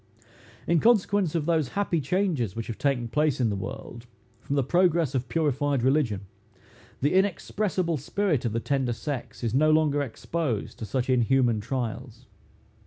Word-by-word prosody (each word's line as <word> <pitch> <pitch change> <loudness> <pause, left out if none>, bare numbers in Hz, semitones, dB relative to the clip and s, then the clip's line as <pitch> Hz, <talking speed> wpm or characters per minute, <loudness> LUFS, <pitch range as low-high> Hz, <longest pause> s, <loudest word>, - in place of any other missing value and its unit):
In 170 -1 +3
consequence 205 -6 +3
of 160 -3 0
those 160 -4 +1
happy 180 -5 +1
changes 145 - 0
which 115 -1 -4
have 115 - -6
taken 135 -4 0
place 150 +3 +1
in 115 -4 +2
the - - -1
world, 115 +5 -7 0.3
from 140 - -3
the 140 - +2
progress 170 -1 +2
of 125 -2 -2
purified 145 -3 0
religion, 130 -7 +2 0.8
the 145 +5 +2
inexpressible 190 -2 0
spirit 160 - -1
of 115 - -1
the 115 - -1
tender 130 -1 0
sex 125 +2 -6
is 115 -2 -1
no 155 +4 +4
longer 155 -2 +3
exposed 140 -1 -3
to 110 - -4
such 125 +3 -2
inhuman 125 -2 +3
trials. 120 0 -5
140 Hz, 160 wpm, -26 LUFS, 120-165 Hz, 0.8 s, no